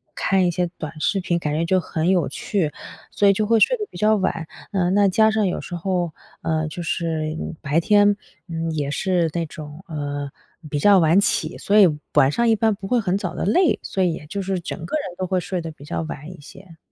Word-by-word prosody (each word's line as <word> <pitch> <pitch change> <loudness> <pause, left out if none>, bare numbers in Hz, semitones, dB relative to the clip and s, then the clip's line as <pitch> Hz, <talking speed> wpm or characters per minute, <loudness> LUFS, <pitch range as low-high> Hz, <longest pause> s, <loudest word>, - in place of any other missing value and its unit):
看 190 -1 +2
一 175 - +1
些 175 +1 0
短 155 0 -6
视 200 +5 +1
频， 175 -2 0
感 150 -2 -2
觉 165 +1 0
就 185 +2 +3
很 160 -1 -2
有 180 -5 +2
趣， 175 -8 -1 0.4
所 200 - +2
以 200 - +6
就 215 +1 0
会 225 0 +4
睡 - - +4
得 420 - -3
比 - - -11
较 215 +1 +4
晚。 180 -4 -1 0.3
嗯， 185 -2 +1
那 200 0 +4
加 220 +3 +4
上 215 -2 +1
有 180 - -2
时 175 - -6
候 175 -2 -1 0.3
呃， 160 -1 0
就 170 +3 -6
是 160 -2 -2 0.3
白 150 +3 +2
天， 205 +2 +4 0.3
嗯， 165 -1 -3
也 145 -2 -2
是 175 +1 +1
那 170 -1 -1
种 155 +2 -10
呃， 145 -3 -4 0.4
比 145 - -2
较 195 +5 +6
晚 165 +3 +4
起， 165 -4 0
所 210 +1 +3
以 195 - +8 0.3
晚 135 +1 +5
上 235 +6 +1
一 225 - +5
般 220 0 +2
不 195 -1 -8
会 245 +2 +2
很 195 -2 0
早 190 -4 -4
的 - - -4
累， 345 - +3
所 190 - -1
以 175 -3 +2
也 150 -2 -8
就 200 - -4
是 190 -1 -1
整 170 - -6
个 310 - -3
人 185 -12 -5
都 185 - -2
会 185 0 0
睡 180 +1 -3
得 165 -1 -5
比 145 - -15
较 150 - -3
晚 155 +1 -7
一 175 - -12
些。 165 +3 -14
180 Hz, 255 characters per minute, -22 LUFS, 160-200 Hz, 0.4 s, 以